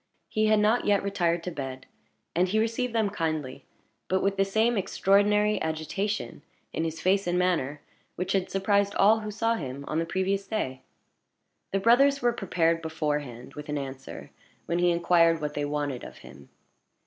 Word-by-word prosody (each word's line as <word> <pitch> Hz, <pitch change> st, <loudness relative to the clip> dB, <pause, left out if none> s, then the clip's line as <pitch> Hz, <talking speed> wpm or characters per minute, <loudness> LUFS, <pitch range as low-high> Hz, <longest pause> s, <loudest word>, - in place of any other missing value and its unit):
He 215 Hz, 0 st, +1 dB
had 215 Hz, 0 st, +4 dB
not 215 Hz, +3 st, +2 dB
yet 205 Hz, -1 st, +3 dB
retired 175 Hz, -4 st, 0 dB
to 180 Hz, -, -4 dB
bed, 135 Hz, -4 st, -6 dB, 0.5 s
and 180 Hz, +2 st, +3 dB
he 205 Hz, +4 st, 0 dB
received 230 Hz, +3 st, 0 dB
them 215 Hz, -3 st, +1 dB
kindly, 155 Hz, -8 st, -3 dB, 0.4 s
but 190 Hz, 0 st, +1 dB
with 195 Hz, 0 st, +1 dB
the 195 Hz, -, +3 dB
same 220 Hz, +4 st, +1 dB
extraordinary 205 Hz, +2 st, +2 dB
agitation 160 Hz, -, -3 dB, 0.3 s
in 160 Hz, -, -1 dB
his 160 Hz, 0 st, -4 dB
face 190 Hz, +2 st, +2 dB
and 175 Hz, 0 st, +1 dB
manner 160 Hz, -6 st, 0 dB, 0.3 s
which 180 Hz, +1 st, -3 dB
had 190 Hz, -1 st, 0 dB
surprised 200 Hz, +1 st, +1 dB
all 215 Hz, +3 st, +5 dB
who 215 Hz, -1 st, -5 dB
saw 225 Hz, +2 st, 0 dB
him 140 Hz, -, -5 dB
on 155 Hz, -, -1 dB
the 165 Hz, -, -2 dB
previous 195 Hz, +2 st, -1 dB
day. 130 Hz, -13 st, -3 dB, 0.9 s
The 195 Hz, -, +1 dB
brothers 275 Hz, +6 st, +4 dB
were 240 Hz, -2 st, +2 dB
prepared 165 Hz, -6 st, 0 dB
beforehand 150 Hz, -6 st, -3 dB
with 150 Hz, 0 st, -9 dB
an 150 Hz, -, -1 dB
answer 135 Hz, -1 st, -7 dB, 0.3 s
when 170 Hz, -, -1 dB
he 175 Hz, 0 st, +3 dB
inquired 170 Hz, -1 st, +3 dB
what 150 Hz, -1 st, -3 dB
they 145 Hz, 0 st, -2 dB
wanted 145 Hz, -3 st, -3 dB
of -, -, -10 dB
him. 70 Hz, +1 st, -14 dB
180 Hz, 175 wpm, -27 LUFS, 150-205 Hz, 0.9 s, all